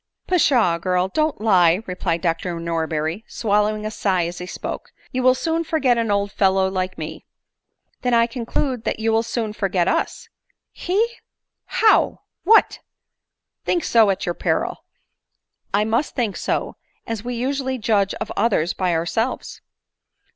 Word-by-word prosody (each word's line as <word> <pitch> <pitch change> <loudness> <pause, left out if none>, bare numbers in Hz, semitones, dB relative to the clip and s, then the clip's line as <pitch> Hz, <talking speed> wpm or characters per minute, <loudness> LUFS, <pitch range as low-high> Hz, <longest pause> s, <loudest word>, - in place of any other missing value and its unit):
" - - -60
Pshaw, 245 - +3
girl! 180 +1 0
don't 310 +7 0
lie," 185 -3 +4
replied 175 -2 -2
Dr 170 0 -1
Norberry, 165 +2 -2
swallowing 210 -1 0
a 215 - -3
sigh 185 -5 0
as 175 +1 -5
he 180 - -6
spoke; - - -6 0.2
"you 255 - -1
will 255 0 +5
soon 325 +4 -1
forget 305 -6 +2
an 230 -2 -1
old 200 0 +1
fellow 190 -1 +2
like 185 0 -2
roe." 160 0 -6 0.4
" - - -48
Then 250 -1 +2
I 230 0 +5
conclude 245 +1 -2
that - - -2
you 225 0 +1
will 225 0 +3
soon 225 -2 -3
forget 190 -4 0
us." - - -1 0.2
" - - -60 0.2
He! 405 +6 +3 0.6
how! 450 -2 +3 0.2
what! 440 +4 +5 0.8
think 345 - 0
so 225 -3 +4
at 190 - -1
your 175 - -1
peril." - - -1 0.5
" - - -53
I 205 +2 +2
must 230 +7 0
think 230 -6 -1
so, - - -2 0.3
as 225 -3 -4
we 245 0 -4
usually 265 +1 -1
judge 210 -4 +1
of - - -5
others 200 -6 +1
by 180 -3 0
ourselves." 225 +9 -2
215 Hz, 160 wpm, -22 LUFS, 180-245 Hz, 0.8 s, will